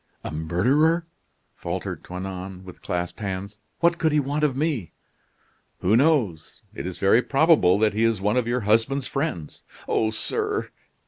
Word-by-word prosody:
"A -, -, -5 dB
murderer!" 130 Hz, -, +2 dB, 0.5 s
faltered -, -, -5 dB
Toinon, 95 Hz, 0 st, -7 dB
with 90 Hz, -, -12 dB
clasped 90 Hz, +2 st, -3 dB
hands. 100 Hz, 0 st, -5 dB, 0.2 s
"What 170 Hz, 0 st, +3 dB
could 160 Hz, -2 st, +2 dB
he 150 Hz, -, +3 dB
want 145 Hz, +2 st, -1 dB
of 135 Hz, -4 st, +1 dB
me?" 140 Hz, -, -1 dB, 0.9 s
"Who 100 Hz, +5 st, +3 dB
knows? 120 Hz, -, +1 dB
It -, -, -5 dB
is 95 Hz, -, -6 dB
very 100 Hz, +5 st, +4 dB
probable 135 Hz, -, +4 dB
that 105 Hz, -1 st, +2 dB
he 110 Hz, +2 st, 0 dB
is 115 Hz, -3 st, +2 dB
one 105 Hz, +3 st, 0 dB
of 125 Hz, -2 st, +1 dB
your 125 Hz, +1 st, 0 dB
husband's 115 Hz, +6 st, +1 dB
friends." 135 Hz, -, -4 dB, 0.3 s
"Oh! 110 Hz, -, +1 dB
sir." 425 Hz, -, -1 dB
110 Hz, 155 wpm, -24 LUFS, 95-145 Hz, 0.9 s, very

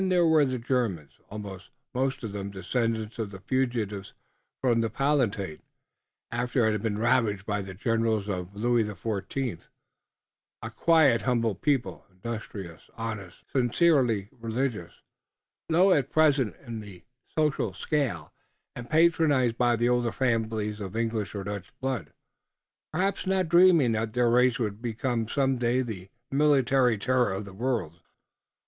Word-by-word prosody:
There 180 Hz, -2 st, +4 dB
were 160 Hz, -3 st, +5 dB
the 130 Hz, -1 st, -2 dB
Germans, 115 Hz, -, -2 dB
also, 100 Hz, -2 st, -7 dB, 0.3 s
most 130 Hz, 0 st, -1 dB
of 110 Hz, -, -4 dB
them 100 Hz, -1 st, -5 dB
descendants 110 Hz, +3 st, -2 dB
of 110 Hz, -3 st, -2 dB
the 95 Hz, -1 st, -10 dB
fugitives 110 Hz, -4 st, -2 dB, 0.4 s
from 120 Hz, -3 st, +2 dB
the 115 Hz, -, 0 dB
Palatinate, 115 Hz, -, 0 dB, 0.7 s
after 125 Hz, -1 st, +1 dB
it 110 Hz, -, +3 dB
had 105 Hz, -1 st, -2 dB
been 105 Hz, -2 st, -1 dB
ravaged 105 Hz, -3 st, +1 dB
by 105 Hz, -1 st, -1 dB
the 95 Hz, -1 st, -8 dB
generals 115 Hz, 0 st, 0 dB
of 95 Hz, -1 st, -4 dB
Louis 120 Hz, +2 st, +2 dB
XIV, 105 Hz, +2 st, -4 dB, 1.0 s
a -, -, -5 dB
quiet, 155 Hz, -8 st, +4 dB
humble 115 Hz, -4 st, +1 dB
people, 135 Hz, +4 st, -1 dB
industrious, 95 Hz, -4 st, -7 dB
honest, 105 Hz, -5 st, -6 dB
sincerely 125 Hz, -, +2 dB
religious, 115 Hz, -5 st, -4 dB, 0.7 s
low 180 Hz, +4 st, +5 dB
at 140 Hz, -6 st, +2 dB
present 145 Hz, -, +3 dB
in 115 Hz, -2 st, -5 dB
the 100 Hz, -4 st, -11 dB, 0.3 s
social 150 Hz, -9 st, +1 dB
scale, 95 Hz, -, -2 dB, 0.4 s
and 120 Hz, -1 st, -8 dB
patronized 155 Hz, -7 st, +3 dB
by 120 Hz, -1 st, +3 dB
the 120 Hz, +1 st, +1 dB
older 120 Hz, -1 st, +1 dB
families 110 Hz, -4 st, -1 dB
of 100 Hz, 0 st, -6 dB
English 115 Hz, -3 st, -2 dB
or 100 Hz, -, -3 dB
Dutch 100 Hz, -1 st, -6 dB
blood, 130 Hz, -, -3 dB, 0.8 s
perhaps 190 Hz, +4 st, -1 dB
not 190 Hz, -2 st, +1 dB
dreaming 170 Hz, -7 st, +6 dB
that 110 Hz, 0 st, -1 dB
their 120 Hz, -1 st, +3 dB
race 125 Hz, 0 st, +4 dB
would 105 Hz, -2 st, -3 dB
become 120 Hz, -1 st, -2 dB
some 135 Hz, +1 st, +1 dB
day 120 Hz, +2 st, +1 dB
the 95 Hz, -6 st, -7 dB, 0.2 s
military 135 Hz, -4 st, +3 dB
terror 125 Hz, +1 st, +1 dB
of 95 Hz, +2 st, -4 dB
the 100 Hz, -, -11 dB
world. 100 Hz, -7 st, -2 dB
115 Hz, 140 wpm, -27 LUFS, 105-130 Hz, 1.0 s, dreaming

